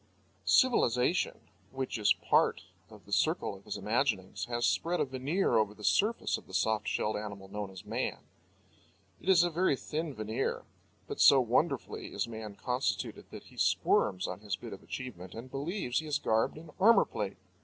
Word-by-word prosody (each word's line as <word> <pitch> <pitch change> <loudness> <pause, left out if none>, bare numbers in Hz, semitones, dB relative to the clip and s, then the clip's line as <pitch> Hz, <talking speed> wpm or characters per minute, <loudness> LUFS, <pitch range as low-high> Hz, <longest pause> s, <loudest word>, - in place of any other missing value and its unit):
Civilization 165 - +3 0.3
(which 130 -2 -4
is 105 - +4
part - - +2 0.3
of - - -15
the - - -15
circle - - +1
of 100 0 -13
his 105 - -4
imaginings) 105 -2 -1
has 120 0 -1
spread 175 +2 +1
a - - +2
veneer 135 +8 0
over 105 -1 +1
the 105 - -13
surface 220 - +2
of - - -20
the - - -7
soft 110 -1 +1
shelled 110 - 0
animal 100 -2 -6
known 105 0 -4
as 95 -1 -11
man. - - -2 1.0
It - - -4
is 175 -3 +7
a 175 - 0
very 170 -2 +2
thin 155 +2 -4
veneer; 110 +4 -2 0.4
but - - -4
so 140 - +8
wonderfully 125 - 0
is 100 - -1
man 110 -3 -7
constituted 125 +5 -2
that - - -9
he - - -18
squirms 95 0 +2
on 90 - -5
his 105 -2 -3
bit 95 - -9
of 100 - -10
achievement 95 -9 -7
and 120 +3 -8
believes 140 -1 -2
he 160 - -6
is 150 - +1
garbed 110 +6 +1
in 155 0 -11
armour 215 +2 +6
plate. 100 -2 -4
120 Hz, 180 wpm, -31 LUFS, 105-150 Hz, 1.0 s, so